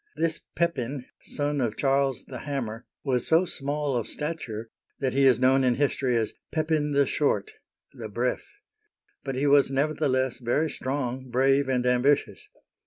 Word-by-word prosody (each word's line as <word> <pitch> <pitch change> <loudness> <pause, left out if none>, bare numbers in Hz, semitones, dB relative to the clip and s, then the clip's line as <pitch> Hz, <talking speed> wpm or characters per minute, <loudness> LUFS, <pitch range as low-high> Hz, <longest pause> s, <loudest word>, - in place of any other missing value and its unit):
This 165 -1 0 0.2
Pepin, 140 -6 -1 0.2
son 145 -1 -2
of 110 -3 -1
Charles 135 -2 +1
the - - -8
Hammer, 120 -5 -4 0.2
was 125 -4 0
so 165 +3 +4
small 145 -3 -2
of 120 - -1
stature 120 -8 -5 0.3
that 130 -2 0
he 135 0 +4
is 125 -2 +5
known 130 +1 +4
in 125 -1 +3
history 135 -3 +1
as 110 -1 -1 0.2
Pepin 155 -2 0
the 140 0 +4
Short 150 - 0 0.4
{le - - -7
Bref\ - - -1 0.8
but 135 -2 -3
he 135 +3 0
was 140 -1 +5
neverthe 150 +2 0
less 130 -2 0
very 140 +6 0
strong, 130 -1 -3
brave, 135 +2 +3
and 125 -1 +1
ambitious. 125 -3 +1
135 Hz, 160 wpm, -26 LUFS, 125-145 Hz, 0.8 s, is